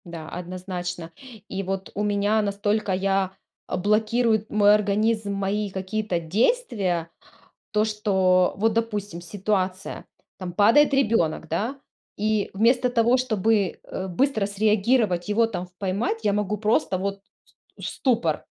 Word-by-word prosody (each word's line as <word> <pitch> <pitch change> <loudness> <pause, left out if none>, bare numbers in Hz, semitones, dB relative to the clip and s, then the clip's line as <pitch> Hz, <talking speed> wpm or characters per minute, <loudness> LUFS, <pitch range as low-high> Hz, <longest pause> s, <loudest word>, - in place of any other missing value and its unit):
Да, 165 -2 -8
однозначно. 180 -1 -6 0.4
И 195 0 -4
вот 195 0 -4
у 210 - -1
меня 205 +1 +2
настолько 205 0 -1
я 190 0 0 0.3
а_ - - -2
блокирует 220 +3 +1
мой 205 -1 +5
организм 210 0 +1
мои 200 +1 -1
какие-то 190 0 -2
действия, 190 - 0 0.6
то, 210 -1 +3
что 190 -4 +2
вот, 220 +3 +2
допустим, 210 -5 -2
ситуация: 185 +1 -3 0.3
там 185 -2 -5
падает 230 +10 +5
ребёнок, 210 - +1
да, 225 - -2 0.4
и 215 0 0
вместо 240 +5 +3
того, 240 0 +3
чтобы, 220 -5 +1
э, 190 - -6
быстро 220 +2 +1
среагировать, 210 -2 +1
его 225 +2 +3
там 185 -5 -5
в 180 - -27
поймать, 205 +4 -2
я 205 - +3
могу 210 0 -1
просто 210 -3 +1
вот 195 +1 -3 0.2
с - - -21
в - - -5
ступор. 225 - 0
205 Hz, 135 wpm, -24 LUFS, 185-220 Hz, 0.6 s, мой